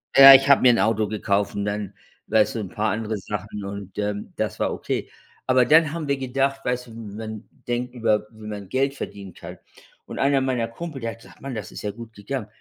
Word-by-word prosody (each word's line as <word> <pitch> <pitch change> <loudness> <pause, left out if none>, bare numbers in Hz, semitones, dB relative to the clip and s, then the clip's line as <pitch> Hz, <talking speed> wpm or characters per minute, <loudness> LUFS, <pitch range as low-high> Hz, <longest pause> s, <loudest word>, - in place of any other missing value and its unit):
Ja, 135 0 +12
ich 135 +1 +6
habe 140 - +7
mir 125 - +7
‘n 120 - +2
Auto 110 -1 +2
gekauft 100 -1 -1
und 100 - -1
dann, 100 -1 -3 0.3
weißt 110 +1 +3
du, - - -1
‘n 105 - -4
paar 110 +2 -1
andere 110 0 -2
Sachen 105 +1 -6
und, 100 -1 -7
ähm, 105 0 -3
das - - -3
war - - 0
okay. - - -3 0.4
Aber, 130 -1 +4
dann 155 +2 +5
haben 165 -3 -4
wir 140 - +2
gedacht, 135 +1 -1
weißt 125 0 -1
du, - - -13
man 110 -1 -8 0.2
denkt 120 +1 -2
über, 110 -3 +1
wie 110 -1 -13
man 105 -2 -6
Geld 135 +1 +1
verdienen 100 -8 -8
kann - - -10 0.5
und - - -7
einer 140 0 +3
meiner 125 -3 0
Kumpel, 145 +4 -7
der 115 0 -2
hat 115 - -12
gesagt: - - -17
„Mann, 135 -2 -5
das 105 -2 -6
ist - - -8
ja 105 - -2
gut 115 +1 -11
gegangen. 110 +2 -5
115 Hz, 230 wpm, -24 LUFS, 105-130 Hz, 0.5 s, Ja